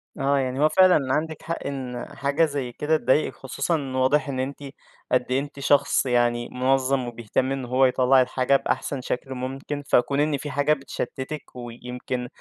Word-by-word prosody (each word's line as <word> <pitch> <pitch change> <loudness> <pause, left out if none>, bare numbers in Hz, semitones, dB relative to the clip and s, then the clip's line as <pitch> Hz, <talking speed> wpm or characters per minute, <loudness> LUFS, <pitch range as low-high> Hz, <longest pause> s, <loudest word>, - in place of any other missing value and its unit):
آه، 140 +1 +1
يعني 130 0 -2
هو 155 +1 +4
فعلًا 155 -6 +4
عندِك 155 +2 -2
حق 170 - -4
إن 130 -3 -5
حاجة 140 +4 +2
زي 140 -5 -3
كده 155 +5 +1
تضايقِك، 150 0 +1
خصوصًا 135 +1 -2
واضح 135 +3 +2
إن 130 -2 -3
أنتِ 140 +2 -4 0.5
قد 125 -1 +3
إيه 130 - +3
أنتِ 140 0 -7
شخص 140 0 +3
يعني 120 -1 +1
مُنظَّم 130 0 +1
وبيهتم 120 +2 -2
إن 135 -2 -3
هو 130 +2 +3
يطلَّع 130 +1 +4
الحاجة 130 +1 +1
بأحسن 135 0 -1
شكل 125 +1 -4
ممكن، 135 +3 -5
فكون 140 +3 +2
إن 150 -1 +2
فيه 145 - -6
حاجة 145 +2 +2
بتشتِّتِك 135 0 -6
ويمكن 125 +1 -5
135 Hz, 170 wpm, -24 LUFS, 125-145 Hz, 0.5 s, هو